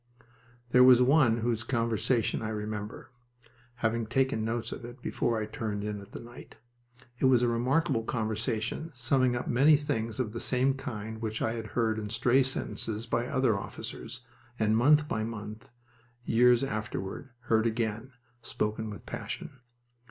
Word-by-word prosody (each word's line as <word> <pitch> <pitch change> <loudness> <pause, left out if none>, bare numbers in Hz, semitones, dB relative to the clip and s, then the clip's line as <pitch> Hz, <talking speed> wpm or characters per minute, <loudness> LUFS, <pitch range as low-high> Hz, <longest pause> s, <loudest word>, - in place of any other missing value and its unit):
There 125 +1 +6
was 125 -1 +8
one 130 -2 +4
whose 115 -1 0
conversation 115 -1 0
I 110 - -3
remember 105 0 -5 0.7
(having 115 0 0
taken 130 -1 +1
notes 115 +1 -2
of - - -7
it 120 +2 -9
before 120 -1 -1
I 110 - -2
turned 110 -4 -4
in 105 -1 -3
that 100 0 -10
night). 120 +1 -12 0.6
It - - +2
was 125 -2 +5
a - - +3
remarkable 120 +2 +1
conversation, 110 +5 -2
summing 125 0 +2
up 120 - -3
many 145 +5 +5
things 115 -6 -3
of 120 -5 -1
the 115 - -5
same 130 +3 +2
kind 110 -4 -6
which 110 0 -3
I 110 - 0
had 115 -1 -5
heard 110 -2 +1
in 105 -1 -5
stray 125 +5 +3
sentences 115 -4 -2
by 120 +1 -1
other 130 -5 +2
officers, 115 +4 -6 0.4
and 110 0 +2
month 150 +6 +5
by 110 - -1
month, 110 -1 -7 0.6
years 120 +2 +4
afterward, 110 0 -4
heard 115 -2 +2
again, 115 +2 -2 0.3
spoken 110 0 -3
with 105 - -9
passion. 140 - -6
115 Hz, 155 wpm, -29 LUFS, 110-125 Hz, 0.7 s, was